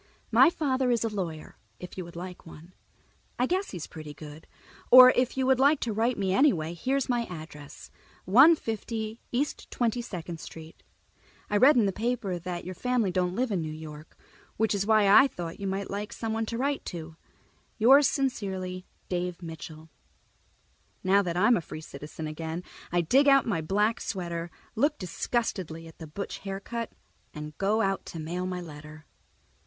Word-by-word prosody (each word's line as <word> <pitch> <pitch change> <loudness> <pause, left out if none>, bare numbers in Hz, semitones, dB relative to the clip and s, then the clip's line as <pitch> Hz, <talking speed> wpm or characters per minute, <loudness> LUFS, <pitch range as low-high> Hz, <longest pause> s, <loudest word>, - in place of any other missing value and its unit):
My - - +7
father 265 -6 0
is 235 -2 +2
a 225 - 0
lawyer, 165 -6 -5 0.2
if 180 - -9
you 185 - -4
would 170 - -12
like 180 +1 -7
one. 165 +3 -13 0.6
I 250 - +2
guess 375 +7 -1
he's 175 -5 -6
pretty 155 -2 -9
good. 150 +2 -11 0.4
Or 255 0 +11
if 250 +1 0
you 265 - +1
would 260 -1 +3
like 280 +2 +5
to 230 - -1
write 230 +4 +1
me 190 -2 0
anyway, 180 - +3
here 255 +11 -1
is 275 - -1
my 240 -2 0
address: 155 -5 -10 0.3
150 225 - +3
East 275 +5 -2
22 240 0 0
St. 165 -5 -8 0.7
I - - +1
read 265 +8 +7
in 225 - +4
the 195 - +1
paper 220 -5 -2
that 175 0 -5
your 185 - -5
family 245 -2 0
don't 180 0 0
live 250 0 0
in 185 -4 0
New 155 -1 -4
York, 155 -1 -10 0.4
which 220 0 +2
is 200 0 -1
why 215 -2 +5
I 240 +8 +8
thought 170 -9 -7
you 200 - -3
might 195 +1 -3
like 210 +3 -4
someone 225 -1 -2
to 230 - -3
write 280 +3 -1
to._ 160 -2 -7 0.6
Yours 265 +5 +7
sincerely, 190 -9 -2 0.2
Dave 180 0 -3
Mitchell 160 -1 -9 1.1
Now 195 +2 +4
that 175 -3 -3
I'm 215 +6 +5
a - - -2
free 155 - -8
citizen 155 +1 -8
again, 160 +3 -5 0.3
I 175 0 +2
dig 270 - +4
out 275 -1 +6
my 185 -8 -1
black 210 +7 +1
sweater, 170 -3 -4 0.2
look 290 +6 +1
disgustedly 180 -3 -3
at 165 - -15
the 160 - -8
butch 200 +7 -6
haircut, 200 +4 -5 0.4
and 150 0 -7
go 210 +3 +2
out 195 -1 0
to 165 - -7
mail 175 +4 -3
my 180 -1 -4
letter. 155 -1 -11
195 Hz, 175 wpm, -28 LUFS, 165-235 Hz, 1.1 s, Or